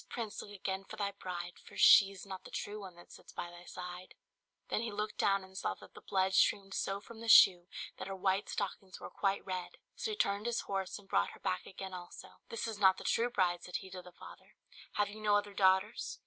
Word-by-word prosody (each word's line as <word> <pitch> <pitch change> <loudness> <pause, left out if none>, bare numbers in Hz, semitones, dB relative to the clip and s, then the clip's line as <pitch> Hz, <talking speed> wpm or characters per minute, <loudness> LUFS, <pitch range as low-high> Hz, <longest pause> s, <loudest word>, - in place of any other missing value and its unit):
prince! 225 -3 -4
look - - -10
again 195 -1 -3
for - - -9
thy 200 -1 -1
bride, 175 -3 -6
For - - -13
she's 195 -1 +7
not 190 -1 -7
the - - -11
true 210 +1 -4
one 190 -3 -9
that 175 - -16
sits - - -13
by 175 - -5
thy 175 0 -12
side." 180 0 -8 0.5
Then - - 0
he 230 -1 -3
looked 210 +1 -4
down 195 -1 +3
and 190 0 -15
saw - - -1
that - - -15
the - - -12
blood 190 0 +1
streamed 195 -1 +3
so 195 0 -1
from 220 +2 -12
the 230 - -6
shoe 180 -5 +8 0.3
that - - -5
her 195 - -4
white 190 +1 0
stockings 195 -2 -4
were - - -8
quite 195 0 0
red. 185 -2 -4 0.2
So - - -3
he 425 - -3
turned 200 - +1
his 235 - 0
horse 195 -1 -3
and 205 -2 -15
brought 95 - +1
her - - -14
back 90 - -2
again 190 0 -7
also. 175 -1 -9 0.2
"This 230 - -3
is 220 -2 -5
not 190 -2 +6
the - - -8
true 235 +1 +2
bride," 175 -6 +1
said 180 - -8
he 190 -1 -4
to 185 0 -7
the 180 0 -13
father; - - -14 0.4
"have 205 - +2
you 210 +2 -9
no 210 -1 +4
other 205 0 0
daughters?" 190 +3 +2
195 Hz, 240 wpm, -34 LUFS, 185-205 Hz, 0.5 s, shoe